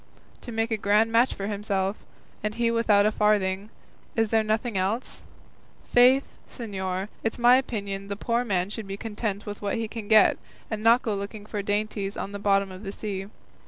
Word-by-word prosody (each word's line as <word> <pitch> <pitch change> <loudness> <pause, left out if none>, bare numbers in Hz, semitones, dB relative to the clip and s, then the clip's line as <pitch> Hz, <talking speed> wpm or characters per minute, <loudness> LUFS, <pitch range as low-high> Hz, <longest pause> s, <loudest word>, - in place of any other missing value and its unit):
To 240 - -7
make 225 0 -1
a 220 - +1
grand 210 +2 +3
match 235 +3 +3
for 195 - -4
himself, 200 -1 -1 0.5
and 210 0 -2
he 235 0 +1
without 215 -3 +4
a 215 - +3
farthing; 205 -1 +1 0.5
is 225 -2 +1
there 220 -1 +3
nothing 220 +1 -1
else? 195 +7 -2 0.7
Faith, 255 +3 +4
señor, 190 -5 -4 0.2
it's 225 - -1
my 245 +1 +6
opinion 200 -6 -3
the 200 - -3
poor 235 +4 0
man 190 -4 -1
should 215 -1 -6
be 195 0 -5
content 210 -1 -4
with 205 -1 -7
what 200 -1 -1
he 225 -1 -2
can 215 -1 -7
get, 220 0 +5 0.3
and 215 -1 -2
not 230 +3 +5
go 220 - -1
looking 205 +1 -5
for 210 -1 -3
dainties 205 0 -2
in 200 - -4
the 200 - -6
bottom 195 -1 +2
of 185 0 -9
the 195 -2 -5
sea. 195 -2 -5
210 Hz, 195 wpm, -26 LUFS, 200-225 Hz, 0.7 s, my